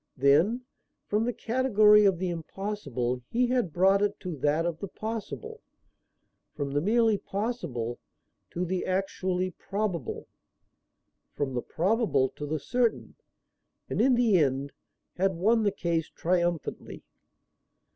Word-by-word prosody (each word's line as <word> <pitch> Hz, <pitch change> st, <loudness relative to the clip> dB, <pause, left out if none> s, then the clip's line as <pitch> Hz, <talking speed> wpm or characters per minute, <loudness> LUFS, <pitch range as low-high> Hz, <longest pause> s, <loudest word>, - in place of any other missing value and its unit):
Then, 155 Hz, -, +4 dB, 0.4 s
from 210 Hz, +2 st, 0 dB
the 245 Hz, -, 0 dB
category 215 Hz, -4 st, +4 dB
of 195 Hz, -3 st, +4 dB
the 185 Hz, +1 st, -2 dB
impossible 160 Hz, -, -3 dB
he 245 Hz, +2 st, +2 dB
had 245 Hz, -7 st, 0 dB
brought 190 Hz, +4 st, +4 dB
it 205 Hz, 0 st, 0 dB
to 180 Hz, -4 st, -4 dB
that 150 Hz, +4 st, +1 dB
of 170 Hz, -2 st, -2 dB
the 200 Hz, -, -4 dB
possible; 230 Hz, -, -6 dB, 0.9 s
from 140 Hz, -2 st, -3 dB
the 145 Hz, +1 st, +1 dB
merely 220 Hz, +2 st, +3 dB
possible 175 Hz, -, -3 dB, 0.5 s
to 180 Hz, +1 st, -2 dB
the 180 Hz, +1 st, -2 dB
actually 185 Hz, -1 st, -1 dB
probable; 190 Hz, -, -4 dB, 1.1 s
from 140 Hz, -2 st, -2 dB
the 120 Hz, -, -1 dB
probable 180 Hz, -, +1 dB
to 145 Hz, -, -7 dB
the 155 Hz, +2 st, -1 dB
certain; 235 Hz, -, 0 dB, 0.8 s
and -, -, +1 dB
in 260 Hz, -1 st, +5 dB
the 230 Hz, -6 st, +4 dB
end 140 Hz, -1 st, 0 dB, 0.5 s
had 190 Hz, 0 st, +1 dB
won 220 Hz, +7 st, +3 dB
the 205 Hz, -2 st, +2 dB
case 170 Hz, -4 st, -1 dB
triumphantly. 175 Hz, -2 st, -2 dB
185 Hz, 130 wpm, -28 LUFS, 155-215 Hz, 1.1 s, in